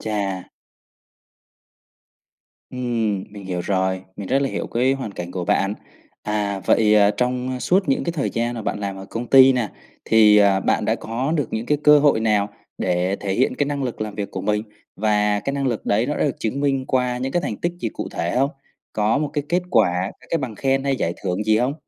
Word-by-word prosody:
Chà! 100 -4 -3 2.2
Ừm, 115 -6 -1
mình 100 -1 -10
hiểu 90 -2 -3
rồi, 95 0 0
mình 100 -2 -6
rất 135 - +3
là 135 - 0
hiểu - - -3
cái 125 +3 +1
hoàn 130 -7 -4
cảnh 90 -1 -6
của 90 -1 -4
bạn. 100 +4 +1 0.5
À, 105 -2 -2
vậy, 105 -1 +4
ờ, 105 -1 +5
trong 125 +3 -2
suốt 185 -3 +2
những 135 - +1
cái 170 - -1
thời 150 -5 -1
gian 120 +1 -1
mà 115 - -5
bạn 105 - -3
làm 100 -1 -3
ở 95 - -8
công 120 +1 -4
ty 135 +1 +7
nè 120 -5 -1 0.4
thì, 110 -2 +6
à, 100 -2 +4
bạn - - +1
đã - - +2
có 125 +7 -3
được 145 -6 -1
những 110 +2 -3
cái 150 -1 +1
cơ 150 0 +8
hội 145 -6 +3
nào 105 -2 +2 0.3
để 90 +2 0
thể 100 -1 -2
hiện 130 - +1
cái 145 - 0
năng 145 -1 -2
lực 125 -4 -4
làm 105 -1 -4
việc 100 -1 -4
của 95 - -5
mình, 105 +1 0 0.3
và 105 -1 +1
cái 140 - -3
năng 140 -1 -1
lực 120 -4 -2
đấy 110 +4 +2
nó 150 - -1
đã - - +1
được 140 - -1
chứng 120 +5 -2
minh 135 -2 +1
qua 125 -1 0
những 130 +1 -3
cái 175 - +1
thành - - -3
tích 175 - -2
gì 115 - -1
cụ - - -6
thể 85 +7 -2
hông? 135 +2 +2 0.4
Có 110 +5 +1
một 150 -2 -2
cái 145 - -2
kết 175 +2 +1
quả, 95 -3 +2 0.2
c - - -31
cái 165 - +1
bằng 125 -6 -4
khen 135 +3 0
hay 135 -1 +1
giải 85 - -1
thưởng 95 +2 -2
gì 110 0 +3
hông? 130 +4 0
110 Hz, 230 wpm, -22 LUFS, 100-135 Hz, 2.2 s, cơ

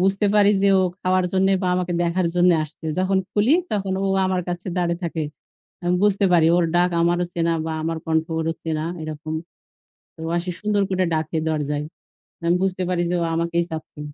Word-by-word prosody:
বুঝতে 195 +2 +2
পারি 205 -1 +6
যে 200 - +5
ও - - +3 0.2
খাওয়ার 185 0 +2
জন্যে 190 +1 +3
বা 185 - +1
আমাকে 180 -1 -1
দেখার 175 +1 +1
জন্যে 175 0 +5
আসছে। 155 +2 -15
যখন 190 +1 +2
খুলি 215 +6 +3 0.2
তখন 195 -2 -1
ও - - +1 0.2
আমার 185 -1 0
কাছে 175 +1 -4
দাঁড়িয়ে 170 0 0
থাকে। 165 -1 -2 0.6
আমি 175 +1 +1
বুঝতে 200 -1 +3
পারি 165 -2 +5
ওর 175 - +3
ডাক 180 +1 +4
আমারও 175 +1 +2
চেনা 170 0 +1
বা 160 - -2
আমার 165 0 -1
কন্ঠ 160 0 +1
ওরও 165 0 -1
চেনা, 160 -1 -2 0.2
এরকম। 155 0 -5 0.9
ও 160 - -4
আসে 180 +1 -3
সুন্দর 210 -1 +1
করে 185 -1 +1
ডাকে 160 +1 -1
দরজায়। 150 -1 -1 0.6
আমি 170 +1 +3
বুঝতে 185 -1 0
পারি 180 -1 0
যে - - 0
ও - - +1
আমাকেই 170 +1 0
চাচ্ছে। 160 -1 -7
175 Hz, 190 wpm, -22 LUFS, 160-185 Hz, 0.9 s, পারি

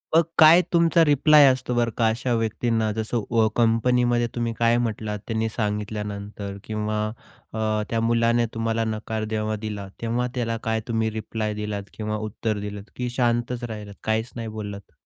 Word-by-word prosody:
मग 165 - +7
काय 160 +3 +8
तुमचा 170 0 +5
रिप्लाय 150 0 +6
असतो 130 -1 +1
बरं 120 -1 +1
का, 115 - +3
अशा 120 +2 -1
व्यक्तींना 115 0 0
जसं 110 +1 -2
व 115 -2 +4
कंपनीमध्ये 120 +1 +2
तुम्ही 120 -1 -1
काय 115 0 +4
म्हटलात, 110 -3 -2
त्यांनी 110 -1 -1
सांगितल्यानंतर 105 -2 -4
किंवा 105 0 -2 0.5
अ, 110 -1 0
त्या 115 - 0
मुलाने 115 +1 +2
तुम्हाला 115 0 0
नकार 110 0 -3
जेव्हा 110 0 -1
दिला, 105 -2 -5
तेव्हा 120 +2 0
त्याला 115 -2 -1
काय 110 0 0
तुम्ही 110 -2 0
रिप्लाय 110 0 -3
दिलात 105 -1 -4
किंवा 110 0 -3
उत्तर 105 0 -2
दिलत, 100 0 -6
की 125 -1 -2
शांतच 120 0 0
राहिलात? 105 -3 -6
काहीच 110 +2 -1
नाही 115 -2 -4
बोललात? 105 -2 -7
115 Hz, 160 wpm, -24 LUFS, 110-120 Hz, 0.5 s, काय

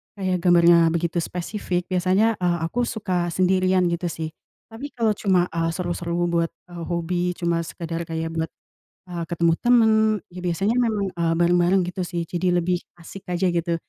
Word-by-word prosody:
kayak 185 -2 -1
gambarnya 170 -2 +6
begitu 170 +1 -1
spesifik, 180 +1 -3
biasanya, 190 +5 +2
eee, 175 -1 +1
aku 235 +8 -1
suka 185 -5 -1
sendirian, 185 +1 +2
gitu 170 +1 -2
sih. 160 -1 -5 0.4
Tapi, 240 +6 -6
kalau 230 -3 +2
cuma, 190 -4 +1
eee, 165 0 -1
seru-seru 175 -1 -3 0.2
buat, 170 -1 +2 0.2
eee, 170 -1 -7
hobi, 175 +1 -1
cuma 170 -1 0
sekedar 165 0 -5
kayak 165 0 -3
buat, 160 0 -2 0.6
eee, 170 -1 -3
ketemu 170 -1 +2
teman, 240 -2 +4 0.4
ya 180 - -9
biasanya 195 +6 0
memang, 215 -5 0
eee, 170 -2 0
bareng-bareng, 175 +2 +3
gitu 180 -1 -4
sih, 170 -2 -3
jadi 175 +2 -1
lebih 175 0 +1 0.2
asik 185 +3 -12
aja, 180 +1 0
gitu. 170 0 0
175 Hz, 165 wpm, -23 LUFS, 170-185 Hz, 0.6 s, gambarnya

